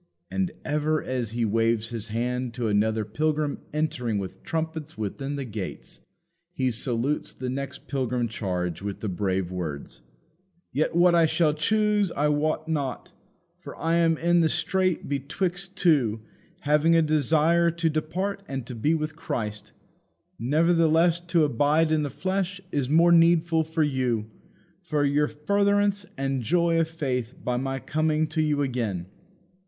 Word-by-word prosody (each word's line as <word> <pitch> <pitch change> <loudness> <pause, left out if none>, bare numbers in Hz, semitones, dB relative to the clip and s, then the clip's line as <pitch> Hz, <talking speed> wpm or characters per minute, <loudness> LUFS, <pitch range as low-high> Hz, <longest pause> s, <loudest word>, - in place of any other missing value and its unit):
And, 190 -2 0 0.2
ever 150 +1 0
as 125 -4 -2
he 115 +1 -1
waves 115 +1 +1
his 115 -2 -5
hand 125 +2 -2
to 120 -3 -1
another 110 +1 +1
pilgrim 150 +6 -1
entering 125 -8 -1
with 95 -2 -6
trumpets 160 -1 -4
within 135 +7 -4
the 140 -1 -4
gates, 105 -5 -7 0.5
he 130 -1 0
salutes 120 +4 -2
his 125 -1 -3
next 140 +1 -5
pilgrim 125 -3 -1
charge 90 -6 -3
with 100 0 -5
the 110 - -2
brave 95 -1 -1
words: 80 -6 -5 0.7
"Yet 155 +5 0
what 175 0 +5
I 165 -1 +5
shall 155 -1 +2
choose 210 +4 +1
I 150 +1 +1
wot 155 +1 0
not. 145 -5 -3 0.5
For - - -9
I 165 +2 +1
am 165 -1 +3
in 170 +1 +3
a 160 - +3
strait 185 -1 0
betwixt 180 +7 -3
two: 130 - +2 0.4
having 150 +3 +3
a 165 - +5
desire 155 +3 +3
to 170 0 -1
depart 170 +6 -2
and 135 -3 -4
to 125 - -7
be 145 +8 +1
with 155 -1 -3
Christ. 105 -9 -4 0.7
Nevertheless 165 +5 +3
to 170 -2 +3
abide 150 +4 +2
in 155 -1 +2
the 145 - -2
flesh 190 +5 -2
is 140 -3 -1
more 165 +3 +5
needful 165 -1 +4
for 160 0 0
you, 125 -6 -1 0.5
for 150 -5 0
your 145 +1 +2
furtherance 200 +5 +1
and 135 -1 -1
joy 170 +5 +2
of 165 - +2
faith 130 -7 -3
by 125 0 0
my 135 +1 -2
coming 155 +3 0
to 155 0 0
you 150 -2 +1
again." 115 -9 -2
150 Hz, 155 wpm, -26 LUFS, 120-165 Hz, 0.7 s, what